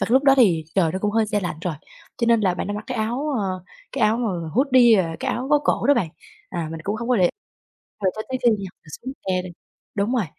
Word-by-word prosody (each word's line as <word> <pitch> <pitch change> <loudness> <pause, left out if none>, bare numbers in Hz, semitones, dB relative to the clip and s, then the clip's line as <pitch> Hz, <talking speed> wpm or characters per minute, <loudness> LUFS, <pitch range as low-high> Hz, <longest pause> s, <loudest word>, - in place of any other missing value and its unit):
và - - +2
cái - - -2
lúc 270 +2 +4
đó 275 -1 +7
thì 180 -11 +4
trời 170 -5 +2
nó 190 - -2
cũng 205 +2 0
hơi 220 +1 +2
se 210 -1 0
lạnh 175 -5 -3
rồi, 175 -2 -2 0.4
cho 235 - +1
nên 230 -1 +5
là 190 -4 +2
bạn - - -3
đó 205 - -3
mặc 210 +1 -5
cái 255 - -3
áo 240 +7 -1
à, - - -1 0.5
cái 270 - -1
áo 215 +1 +3
mờ 185 -9 -2
hoodie, 250 -3 +6
à, 165 -2 -5
cái - - -1
áo 255 +2 -3
có 295 - +6
cổ - - +1
đó 285 - +6
bạn. 180 - 0 0.4
À, 165 -2 -3
mình 160 0 -6
cũng 205 +2 -1
hông 235 +2 -5
có 250 - +3
để 180 -4 +4 0.7
rồi 185 - +3
cho 215 - -3
tới 260 - -1
khi 240 - +6
nha, - - +3 0.3
mình 155 - -16
xuống 260 - -5
xe 185 -1 +1
đi 185 - -7 0.5
đúng 205 +4 0
rồi, 225 -6 +1
215 Hz, 285 wpm, -23 LUFS, 185-245 Hz, 0.7 s, đó